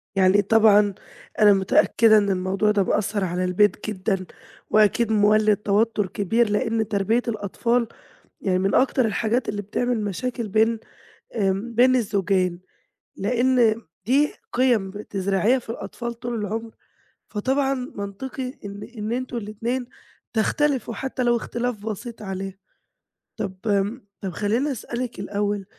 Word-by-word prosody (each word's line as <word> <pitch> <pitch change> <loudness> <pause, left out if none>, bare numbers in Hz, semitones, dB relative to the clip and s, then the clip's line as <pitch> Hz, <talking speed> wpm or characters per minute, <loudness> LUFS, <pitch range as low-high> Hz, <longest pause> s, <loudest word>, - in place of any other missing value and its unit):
يعني 195 +1 +5
طبعًا 210 -1 +5 0.5
أنا 205 -1 +7
متأكدة 215 +3 +4
إن 205 -1 +2
الموضوع 195 +3 +1
ده 205 -2 +2
مأثّر 205 +1 0
على 180 0 -1
البيت 205 +5 +2
جدًا، 190 -1 -2 0.4
وأكيد 215 +2 +3
مولِّد 215 0 +4
توتر 210 0 +1
كبير 210 +4 +1
لإن 225 0 0
تربية 215 +3 +1
الأطفال 230 +2 0 0.5
يعني 185 -2 +1
من 195 +1 +1
أكتر 260 -2 +3
الحاجات 225 +3 0
اللي 205 0 -3
بتعمل 235 +3 -1
مشاكل 230 +4 -3
بين 220 +2 +2 0.6
آمم، 200 +3 -1
بين 255 +2 +5
الزوجين، 195 -5 0 0.6
لإن 240 +1 +2
م 230 - -13 0.2
دي 280 +5 +3 0.2
قِيم 235 -6 +2
بتزرعيها 200 +3 0
في 235 - -10
الأطفال 235 +1 -5
طول 240 +1 -5
العُمر 225 +1 -3 0.6
فطبعًا 270 +6 0 0.2
منطقي 250 +6 -5
إن 200 0 -7 0.2
إن 215 +2 -3
أنتم 250 0 -3
الاتنين 230 +4 -3 0.5
تختلفوا 250 +1 0
حتى 265 -1 -3
لو 240 -1 +3
اختلاف 235 -2 -3
بسيط 225 +1 -6
عليها. 195 -1 -5 0.8
طَب 190 -2 -4
آمم، 205 +3 0 0.2
طَب 195 - -3
خلّيني 220 - 0
اسألِك 240 -2 -5
الأول 205 0 -2
215 Hz, 130 wpm, -23 LUFS, 200-240 Hz, 0.8 s, أنا